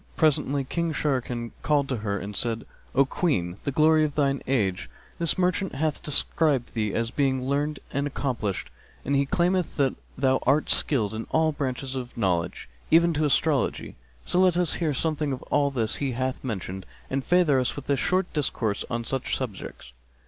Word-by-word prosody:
Presently 145 -3 +2
King 170 +4 -1
Sharrkan 125 -5 -1
called 145 -2 +2
to 130 - 0
her 100 -2 -2
and 100 +1 -6
said, 115 0 -1 0.3
"O 140 +1 +5
Queen, 95 - -1
the 140 - 0
glory 155 +2 +4
of 150 -2 -1
thine 140 -2 +1
age, 100 -9 0 0.3
this 170 -2 +3
merchant 180 -2 0
hath 155 +1 -1
described 145 -3 +1
thee 105 -3 0
as 115 +2 -1
being 130 -3 +1
learned 145 +2 0
and 140 +1 0
accomplished; 125 -8 -3 0.3
and 140 - +1
he 140 0 +2
claimeth 180 +3 +1
that 135 -3 +2 0.2
thou 130 0 +3
art 140 +4 +2
skilled 110 -8 +2
in 110 +1 -4
all 160 0 +3
branches 135 -2 -3
of 125 -1 -6
knowledge, 90 -5 -1 0.2
even 170 +1 +5
to 155 0 +1
astrology: 145 0 +1 0.3
so 180 - +1
let 185 -2 +4
us 180 -3 +1
hear 160 -3 +2
something 155 0 0
of 130 - -6
all 140 -1 +3
this 115 -5 -1
he 135 -3 -1
hath 130 +1 -2
mentioned, 95 -6 -5 0.2
and 135 0 0
favour 175 -6 +4
us 125 - 0
with 145 - -8
a 140 - +3
short 185 +6 +1
discourse 120 -8 -1
on 115 0 -2
such 130 +2 -1
subjects." 100 - -7
135 Hz, 180 wpm, -26 LUFS, 120-155 Hz, 0.3 s, O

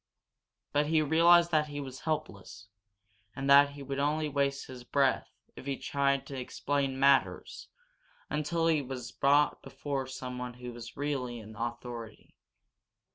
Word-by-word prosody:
But 145 0 +2
he 160 0 +3
realized 170 +3 +5
that 155 -2 +2
he 145 -1 -6
was 130 -2 -7
helpless, 100 - -5 0.7
and 135 +1 -3
that 140 0 +7
he 140 -1 -9
would 135 0 -4
only 150 +2 +1
waste 140 -1 0
his 125 -1 -10
breath 135 +1 +1 0.3
if 130 - -10
he 135 -1 -1
tried 140 -1 0
to 135 -2 -6
explain 135 +1 -2
matters 140 0 +2 0.6
until 165 +2 -1
he 160 -3 +3
was 125 -3 -6
brought 145 +4 +3
before 140 -2 -4
someone 125 -1 -6
who 125 0 -8
was 120 +1 -10
really 135 -4 -2
in 110 -1 -11
authority. 120 0 -6
140 Hz, 145 wpm, -30 LUFS, 125-145 Hz, 0.7 s, that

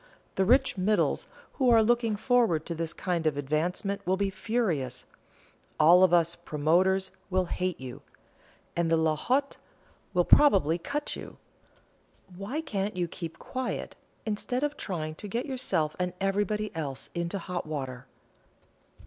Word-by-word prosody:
The 190 - +1
rich 260 -1 +3
'middles' 210 +3 +1 0.3
who 260 -2 +4
are 225 -2 +6
looking 230 -1 +2
forward 215 - +2
to 170 - -3
this 165 0 -3
kind 170 -3 -1
of 145 -2 0
advancement 165 +8 -1
will 185 +2 +1
be 200 0 0
furious; 190 - -1 0.7
all 175 +4 +7
of 185 - +5
us 170 -1 +4
'promoters' 175 +4 +1 0.2
will 185 -1 +1
hate 180 0 -2
you, 130 -2 -8 0.7
and 170 -1 +1
'la 160 -1 +3
haute' 270 - 0 0.6
will 175 -1 +4
probably 185 - +5
cut 285 - -3
you. - - -9 1.0
Why 205 - -3
can't 205 -9 -3
you 175 -1 0
keep 165 -1 -7
quiet, 255 -1 -4 0.3
instead 235 +5 -2
of 295 0 0
trying 155 - -4
to 205 - -8
get 230 +5 -2
yourself 245 - -1
and 180 -1 -1
everybody 205 +1 -1
else 140 -5 -5
into 170 +3 -2
hot 180 -2 -4
water?" 135 -4 -5
185 Hz, 145 wpm, -28 LUFS, 165-215 Hz, 1.0 s, all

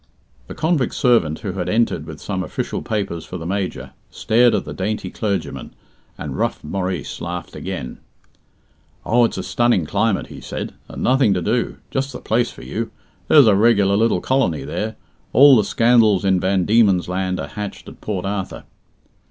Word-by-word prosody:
The - - -8
convict 155 -5 0
servant, 100 - +2
who 100 - -3
had 90 -1 -3
entered 110 -8 0
with 80 -2 -8
some 95 -3 -3
official - - -4
papers 100 -6 -3
for 90 - -7
the 80 - -7
Major, 95 +1 -3 0.2
stared 120 +1 +3
at 100 - -2
the - - -6
dainty 105 +3 -3
clergyman, 100 -3 -3 0.4
and - - -5
rough - - -2
Maurice 90 0 -4
laughed 85 +1 -5
again. 65 - -6 1.1
"Oh, 120 +1 +4
it's - - -3
a - - -3
stunning 120 -8 +1
climate," 110 +5 0
he - - -11
said; - - -5 0.2
"and - - -6
nothing 130 -6 +3
to 90 - -1
do. 115 +5 -1
Just 135 0 -2
the - - -6
place 120 +2 0
for - - -12
you. - - -4 0.4
There's 145 -4 +7
a 110 - +5
regular 100 -2 +4
little 115 +2 +2
colony 130 - 0
there. 110 0 -4 0.4
All 140 +1 +8
the 110 - +4
scandals 115 -4 +3
in 95 -1 +3
Van 95 0 +1
Diemen's 105 -5 +3
Land 90 0 -2
are 70 - -5
hatched 100 +6 -7
at - - -12
Port 95 -4 -3
Arthur." 95 -1 -4
100 Hz, 175 wpm, -20 LUFS, 90-115 Hz, 1.1 s, All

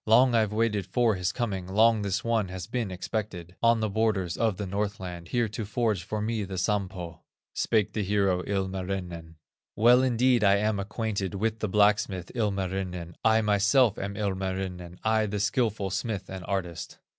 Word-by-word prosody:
Long 125 +3 +6
I've 110 -3 +2
waited 105 -3 0
for 120 -3 +2
his 90 -2 -1
coming, 100 -7 -3
Long 110 +3 +4
this 100 -1 -1
one 115 -4 +1
has 90 -1 -6
been 115 0 -2
expected, 90 -2 -5
On 115 -1 +4
the 110 - +1
borders 100 -5 0
of 110 -5 0
the 105 - -3
Northland, 95 -3 -4
Here 120 +4 +1
to 110 +2 -4
forge 110 -2 0
for 105 +3 -3
me 110 -1 -1
the 95 -1 -6
Sampo." 90 -4 -2 0.3
Spake 105 -3 +1
the 110 - -1
hero, 100 -2 +1
Ilmarinen: 95 -4 -3 0.4
"Well 120 +3 +6
indeed 125 -2 +3
am 100 +1 +3
I - - 0
acquainted 100 -2 -3
With 110 +2 -1
the 110 - -2
blacksmith, 100 -3 +2
Ilmarinen, 95 -5 -2
I 110 0 +4
myself 105 +3 +3
am 100 0 -4
Ilmarinen, 95 -3 -3
I, 110 0 +2
the 105 0 -3
skilful 105 -1 0
smith 100 -1 -3
and 95 -1 -6
artist." 90 -4 -4
100 Hz, 170 wpm, -27 LUFS, 95-110 Hz, 0.4 s, Long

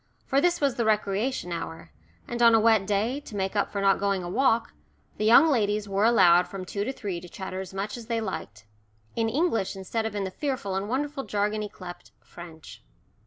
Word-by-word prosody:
For 275 0 +2
this 350 +1 +2
was 280 -4 0
the 235 - +1
recreation 210 0 0
hour, 165 - -6 0.4
and 240 0 -4
on 230 -1 +7
a - - +5
wet 220 -3 +3
day, 215 +7 0
to 260 -7 -11
make 190 0 -2
up 205 - 0
for 200 - -2
not 195 0 +3
going 195 -2 0
a 175 - -5
walk, 235 +2 +1 0.4
the 215 - -1
"young 240 +8 +7
ladies" 210 -7 +1
were 200 +1 +1
allowed 180 -6 +5
from 185 0 -7
two 200 +2 -3
to 260 - -2
three 195 -9 -5
to 180 - -11
chatter 190 0 -6
as 190 - -8
much 195 +2 -4
as 230 -2 -10
they 230 -1 -1
liked 115 - -6 0.5
in 225 -1 +1
English 250 - 0
instead 220 +4 -3
of 215 - -7
in 205 - -1
the 190 - -4
fearful 260 -7 -3
and 195 +2 -2
wonderful 280 +2 -2
jargon 210 0 -1
yclept 185 -4 -9
"French." 165 -2 -12
205 Hz, 215 wpm, -26 LUFS, 190-235 Hz, 0.5 s, on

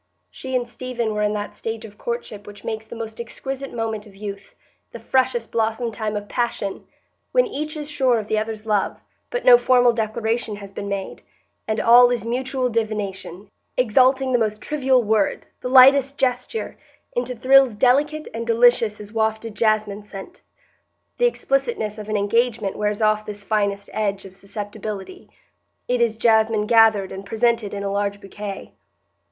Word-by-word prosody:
She 260 -1 -6
and 245 -1 0
Stephen 240 -2 -3
were 210 - -2
in 210 0 +1
that 210 0 -4
stage 225 0 -5
of 210 -2 -12
courtship 235 -3 -5
which 205 -1 -12
makes 220 -1 -5
the - - -9
most 225 0 -6
exquisite 270 +3 -6
moment 225 -2 -4
of 200 - -17
youth, 200 -1 -8 0.4
the - - -8
freshest 255 -3 0
blossom 225 +1 -1
time 215 -1 -3
of 205 0 -6
passion,—when 240 - -3
each 305 +2 -5
is 295 -1 -5
sure 265 -5 +2
of 215 - -3
the 215 - +1
other's 220 0 -5
love, 210 -3 0 0.3
but - - -3
no 245 -1 +9
formal 245 -1 +4
declaration 225 0 -2
has 200 -1 -10
been 200 0 -6
made, 200 -1 -4 0.5
and 220 0 -1
all 245 +1 +7
is 240 -3 -1
mutual 255 +2 -1
divination, 210 -4 -3 0.3
exalting 260 +2 +3
the 245 - +4
most 215 -2 -1
trivial 265 -3 +1
word, 215 -2 +1 0.2
the 250 - -3
lightest 270 +2 +6
gesture, 255 - -2 0.4
into 250 +1 -2
thrills 260 -1 +5
delicate 290 +6 +2
and 230 +1 -5
delicious 230 -2 +4
as 210 +1 -10
wafted 220 0 -1
jasmine 215 -1 0
scent. 210 - -11 0.8
The 485 - +5
explicitness 240 - -1
of 210 0 -8
an 215 - 0
engagement 220 0 0
wears 210 +1 -1
off 215 0 +2
this 205 -1 -7
finest 200 -1 -1
edge 200 -2 -2
of 190 -1 -12
susceptibility; 205 - -7 0.6
it 250 -1 +1
is 225 -2 +1
jasmine 220 -2 +3
gathered 220 -3 +4
and 190 +1 -7
presented 225 +1 0
in 200 0 -5
a 200 - -2
large 200 0 -1
bouquet. 200 0 -8
225 Hz, 165 wpm, -22 LUFS, 210-245 Hz, 0.8 s, no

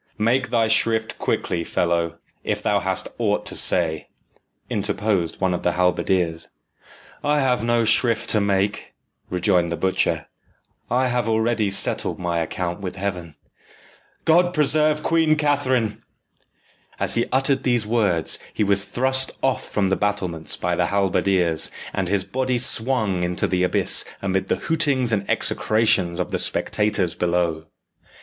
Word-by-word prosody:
"Make 115 +3 +1
thy 115 -2 +2
shrift 110 0 +1
quickly, 85 -1 -1
fellow, 85 -1 -1 0.3
if - - -3
thou - - +2
hast - - -1
aught - - 0
to - - -3
say," 80 -3 +2 0.6
interposed 100 -4 -1
one 95 -1 +1
of 90 - -3
the 90 - 0
halberdiers. 90 -1 0 0.8
"I 150 0 +2
have 125 -4 +1
no 120 0 +1
shrift 115 0 +2
to 105 - +3
make," 100 0 -1 0.3
rejoined 90 -1 +1
the 85 - -3
butcher. 95 0 0 0.6
"I 130 +1 +1
have 120 -2 -1
already 110 -1 +1
settled 95 - 0
my 85 -2 -2
account 85 +2 -3
with 95 -2 -6
Heaven. 90 -5 -5 0.9
God 175 +2 +3
preserve 150 0 +2
Queen 160 -2 +2
Catherine!" 130 -7 0 1.0
As - - 0
he 115 - 0
uttered 135 0 +2
these 120 -4 +1
words, 105 -8 +1
he - - -1
was 100 -1 +2
thrust 130 +1 +2
off 135 0 -1
from 100 -2 0
the 95 - +2
battlements 90 -7 -2
by 90 0 -1
the 90 0 0
halberdiers, 95 -4 +1 0.2
and 95 -2 -2
his 100 0 0
body 130 +6 -1
swung 115 -6 +1
into 90 0 -1
the 90 -1 -1
abyss 90 - +2 0.2
amid 95 -1 -2
the - - +1
hootings 140 -7 +2
and 100 -2 -2
execrations 100 -6 +1
of 90 - -3
the - - -1
spectators 100 -5 0
below. 85 -2 -1
100 Hz, 145 wpm, -22 LUFS, 90-120 Hz, 1.0 s, to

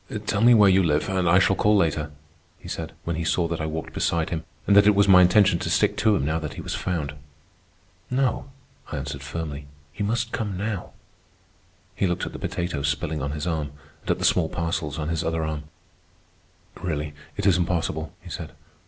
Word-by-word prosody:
"Tell 100 0 0
me 120 +1 +7
where 105 -2 +7
you 95 0 +5
live, 75 -4 +1
and 95 -2 +1
I 90 - +6
shall 95 +1 +4
call 105 +2 +3
later," 80 -5 +1 0.5
he - - -13
said, - - -5
when 85 -1 -2
he 85 - -2
saw 85 +1 +1
that 85 -1 -3
I 80 - -1
walked 80 0 -5
beside 85 -2 0
him 80 -1 -2 0.2
and 100 - +4
that 100 0 +7
it 105 - +5
was 100 0 +4
my 90 -2 +8
intention 90 0 +5
to - - -3
stick - - +2
to 110 -1 +3
him 70 - 0
now 80 +2 0
that 75 -2 -6
he - - -6
was - - -4
found. 80 -6 -2 1.0
"No," 130 0 0 0.4
I 75 - -3
answered 70 0 -5
firmly. 70 0 -5 0.3
"You 105 - -2
must 115 +3 -1
come 105 -4 -3
now." 105 -1 -4 1.0
He 95 +1 0
looked 90 0 -1
at - - -7
the - - -7
potatoes 75 -5 -2
spilling 75 +2 -2
on 70 +2 -2
his 75 -1 -4
arm, 80 -4 -2 0.3
and - - -11
at - - +2
the - - -1
small 80 -3 +3
parcels 85 -3 -2
on 75 0 -3
his 85 0 -1
other 80 0 -1
arm. 75 -1 -4 1.2
"Really, 75 -4 -3 0.2
it - - -2
is 95 -4 +5
impossible," 80 -3 -1
he 90 - -12
said. 80 -3 -6
85 Hz, 215 wpm, -25 LUFS, 80-95 Hz, 1.2 s, my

